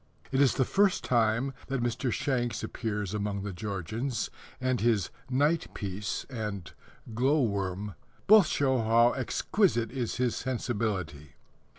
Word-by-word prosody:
It 135 +1 +2
is 140 - +4
the 130 - +2
first 195 +4 +2
time 120 +2 +2
that 135 -3 -1
Mr. 120 +1 -1
Shanks 125 -6 -1
appears 105 -4 -3
among 100 -1 -2
the 100 -1 -4
Georgians, 105 +6 -3 0.3
and 130 -3 0
his 110 -5 +2 0.2
Night 145 +5 +1
Piece 100 0 -4
and 105 -7 -5 0.4
Glow 135 +5 +3
worm 100 -2 -2 0.3
both 210 -4 +7
show 130 -4 +1
how 115 +2 +5
exquisite 130 - +1
is 125 -3 -2
his 125 -2 0
sensibility. 100 - -3
115 Hz, 130 wpm, -29 LUFS, 105-130 Hz, 0.4 s, both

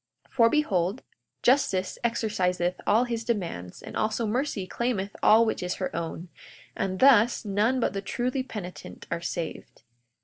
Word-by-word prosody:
42:24 - - -30
For 230 -3 +5
behold, 205 - 0 0.4
justice 220 -8 +2
exerciseth 185 -7 0
all 225 +4 +4
his 235 -2 -3
demands, 170 - -4
and - - -8
also 215 +2 0
mercy 230 -3 -1
claimeth 205 -3 -2
all 225 +2 +6
which 220 - -1
is 180 0 -2
her 185 - -4
own; 170 +1 -5 0.5
and 185 -1 -2
thus, 245 -4 +5
none 210 +6 +1
but 235 - 0
the 195 - -3
truly 250 +6 -2
penitent 205 -8 -8
are 170 - -2
saved. 170 -1 -5
210 Hz, 150 wpm, -27 LUFS, 185-235 Hz, 0.5 s, all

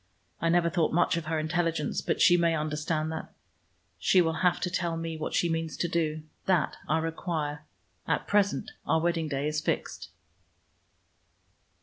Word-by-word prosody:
I 165 - +2
never 170 0 +3
thought 170 -2 +1
much 175 +1 +3
of 170 -2 -3
her 160 0 -1
intelligence, 160 -1 0
but - - -1
she 175 - +7
may 170 -1 +3
understand 155 +1 -1
that. 160 - -6 0.7
She 185 - +4
will 165 -2 +2
have 180 -1 +3
to 180 - -1
tell 170 -2 -1
me 165 0 -4
what 155 - -3
she 175 - +3
means 165 -1 -2
to 175 - 0
do. 155 -2 -1 0.2
That 185 -5 +2
I 155 - +2
require. 160 -2 -3 0.4
At - - 0
present 200 -1 +1 0.2
our 160 - +3
wedding 165 -1 0
day 140 0 -1
is 150 0 -1
fixed." - - -3
165 Hz, 170 wpm, -28 LUFS, 155-170 Hz, 0.7 s, she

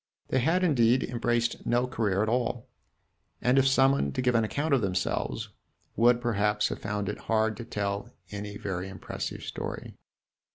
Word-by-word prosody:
They 130 - +2
had, 165 +8 +2
indeed, 125 -6 +4
embraced 120 0 -1
no 120 +1 +2
career 105 -5 0
at - - -1
all, 120 +1 -1 0.7
and 125 +2 +3
if 135 - +4
summoned 135 - +3
to - - 0
give 125 -1 +3
an 115 -1 +3
account 145 +7 -1
of 135 - +4
themselves 95 -2 -1 0.5
would, 120 +1 +5
perhaps, 105 -3 +1
have - - -4
found 100 0 -2
it 105 - -3
hard 110 -1 +2
to 120 - -6
tell 100 -2 -3 0.2
any 100 0 -5
very 95 -2 -4
impressive 95 - -6
story. - - -5
115 Hz, 165 wpm, -28 LUFS, 105-125 Hz, 0.7 s, would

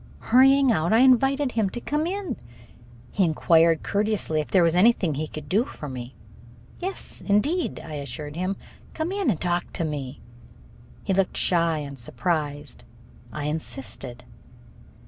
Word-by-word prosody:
Hurrying 270 +2 +5
out, 170 -4 +1
I 225 +2 +5
invited 270 +2 +4
him 220 -4 +1
to 240 - -6
come 300 +6 -1
in. 390 0 -3 0.8
He 195 - +2
inquired 165 0 +3
courteously 205 -6 0
if 150 - -8
there 185 -3 +4
was 165 0 +3
anything 185 -4 +4
he 155 +3 -3
could 150 -1 -8
do 205 +9 +2
for 155 - -8
me. 130 -1 -7 0.6
"Yes, 380 +2 -6
indeed," 285 - +1
I 155 - -9
assured 145 +2 -6
him. 185 +3 -1 0.4
"Come 320 +3 -2
in 395 -7 0
and 180 -9 0
talk 175 0 -1
to - - -2
me." 145 -4 -4 0.8
He 195 - 0
looked 190 0 +1
shy 170 -2 +2
and 140 -2 -6
surprised. 145 0 -3 0.5
I 150 - -5
insisted. 135 -5 -5
175 Hz, 150 wpm, -25 LUFS, 150-240 Hz, 0.8 s, Hurrying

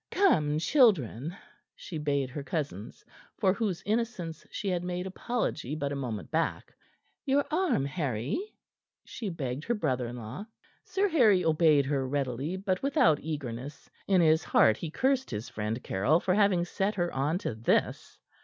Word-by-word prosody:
Come, 155 - +3
children," 165 - +2 0.4
she 160 - -7
bade 140 -3 -1
her 145 - -5
cousins 140 - -5 0.3
for 185 - +3
whose 200 -4 -2
innocence 210 -7 -2
she 205 - -5
had 180 -1 -1
made 180 0 -3
apology 190 - -3
but 140 -2 -2
a - - -2
moment 120 -6 -5
back. 165 +1 -1 0.5
"Your 280 0 +2
arm, 310 - +1
Harry," 140 - -2 0.7
she 220 -4 -5
begged 140 -5 -4
her 240 - 0
brother 130 - -1
in 120 - -6
law. 125 - -7 0.4
Sir 390 +2 +1
Harry 220 - +4
obeyed 155 -3 +4
her 135 -1 -1
readily, 140 +4 -2
but 190 -1 -1
without 270 - +3
eagerness. 140 -3 -6 0.2
In 190 -3 +4
his 160 -1 +4
heart 110 -1 +4
he 165 - -5
cursed 265 - +1
his 105 0 -5
friend 110 +3 -3
Caryll 130 - +2
for 185 - 0
having 195 -3 +3
set 195 +4 -1
her 175 -2 -1
on 145 +5 0
to 185 - -3
this. 110 +2 0
160 Hz, 160 wpm, -29 LUFS, 135-195 Hz, 0.7 s, Harry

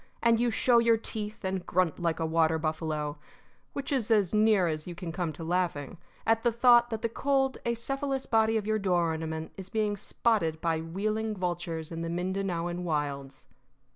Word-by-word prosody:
And 230 -1 +4
you 240 0 +2
show 235 +1 +4
your 230 -1 +4
teeth 215 -2 -5
and 190 -1 -2
grunt 180 -2 0
like 170 -2 -1
a 165 - 0
water 160 0 +2
buffalo 155 -2 -2 0.5
which 280 0 -4
is 255 -6 0
as 210 -5 +3
near 210 -3 +4
as 155 0 -3
you 175 - -6
can 170 -1 -5
come 170 -1 -2
to 165 - -8
laughing 170 -3 -1 0.3
at 225 0 +3
the 240 - +2
thought 240 0 +5
that 225 -2 -4
the - - +3
cold, 270 +3 0
acephalous 270 +3 -1
body 225 0 +3
of 210 - -3
your 215 0 +1
door 175 -4 +2
ornament 160 0 -4
is 190 -1 -8
being 215 -1 0
spotted 200 -7 0
by 165 -1 0
wheeling 215 +6 -2
vultures 175 -3 -3
in 165 0 -4
the 165 - -3
Mindanaoan 180 -1 -2
wilds. 140 -4 -3
185 Hz, 185 wpm, -29 LUFS, 165-225 Hz, 0.5 s, thought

